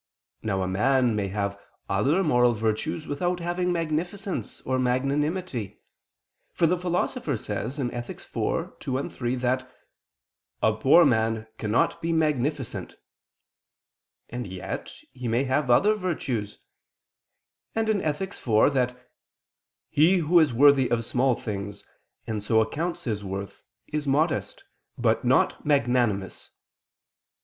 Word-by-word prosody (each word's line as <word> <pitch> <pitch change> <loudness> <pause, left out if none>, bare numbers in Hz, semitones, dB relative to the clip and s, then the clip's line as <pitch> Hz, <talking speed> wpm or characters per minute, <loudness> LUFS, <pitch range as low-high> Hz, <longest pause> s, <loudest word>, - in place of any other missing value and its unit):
Now 95 -3 -1
a - - -1
man 120 +4 +2
may 100 -2 -1
have 100 0 -3 0.3
other 140 - +2
moral 125 -6 +4
virtues 115 +9 -2
without 175 +5 -1
having 175 +1 -1
magnificence 175 +4 -3
or 130 0 -1
magnanimity: 135 - -1 0.8
for 170 - +2
the 175 +3 +3
Philosopher 180 - -1
says 110 +7 -4
(Ethic. 120 -2 -4 0.2
iv, - - -2
2, 130 +1 -2
3) 120 0 -2
that 130 +1 -1 0.9
"a 110 - +4
poor 135 +10 +6
man 110 -3 +1
cannot 105 +2 +1
be 165 - -1
magnificent," 140 - -1 1.3
and 120 -2 -5
yet 95 -1 -6 0.2
he 125 -2 -6
may 120 +3 +2
have 130 0 0
other 200 - +5
virtues; 135 - -3 1.2
and 225 0 +1
(Ethic. 160 +6 -2
iv) 110 +4 +2
that 125 -1 -1 0.8
"he 165 +6 +4
who 170 +1 +4
is 155 -4 +4
worthy 135 +1 +5
of 115 -1 0
small 125 +1 +2
things, 100 -1 -6 0.4
and 110 -3 -3
so 110 +2 +2
accounts 160 +10 -1
his 105 -4 -2
worth, 100 0 -6 0.2
is 150 -1 -3
modest, 155 +3 0 0.3
but - - +1
not - - +2
magnanimous." 120 -8 +1
130 Hz, 120 wpm, -26 LUFS, 110-155 Hz, 1.3 s, poor